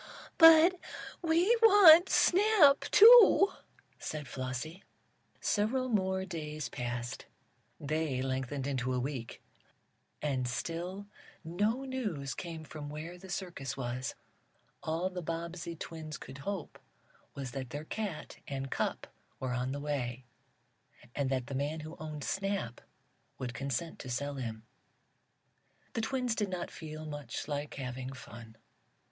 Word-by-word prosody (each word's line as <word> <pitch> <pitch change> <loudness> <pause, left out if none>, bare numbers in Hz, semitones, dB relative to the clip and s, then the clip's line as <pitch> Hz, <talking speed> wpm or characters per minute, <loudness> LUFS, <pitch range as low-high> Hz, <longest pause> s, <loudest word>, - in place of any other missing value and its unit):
"But 325 +2 +8 0.4
we 345 +7 +3
want 385 -6 +9
Snap, 370 -7 +5
too!" 440 -2 +9 0.5
said 150 -3 -5
Flossie. 130 +8 -5 0.6
Several 255 +5 0
more 190 -3 0
days 155 -5 -5
passed. 120 -1 -5 0.5
They 155 -3 -1
lengthened 130 +1 -2
into 130 -2 -1
a - - 0
week, 125 -3 -5 0.8
and 130 -4 -1
still 175 +9 -4 0.4
no 205 +10 0
news 210 - -3
came 165 -3 -7
from 150 -1 -8
where 160 +4 -7
the 190 +1 -12
circus 175 -8 -5
was: 125 0 -3 0.7
All 170 +4 -1
the 180 -1 -5
Bobbsey 170 +1 -5
twins 160 -1 -7
could 135 +1 -10
hope 190 +1 -5 0.6
was 135 -3 -5
that 130 -1 -5
their 145 +4 -6
cat 200 -4 -5
and 135 -1 -4
cup - - -2 0.3
were 130 -1 -2
on 125 +1 -1
the 140 - -3
way, 130 -4 -3 0.9
and 140 -2 -1
that 130 -2 -1
the 140 - -7
man 145 +4 -2
who 155 +2 -8
owned 155 -2 -6
Snap 195 - -2 0.6
would 125 -1 -5
consent 140 +5 -3
to 130 - -8
sell 140 +3 -2
him. 110 -4 -5 1.3
The 225 - -1
twins 250 +1 -1
did 210 -3 -1
not 180 -2 -4
feel 155 -1 -8
much 145 -5 -6
like 145 0 -4
having 130 -1 -5
fun. 115 -3 -11
155 Hz, 130 wpm, -32 LUFS, 130-195 Hz, 1.3 s, want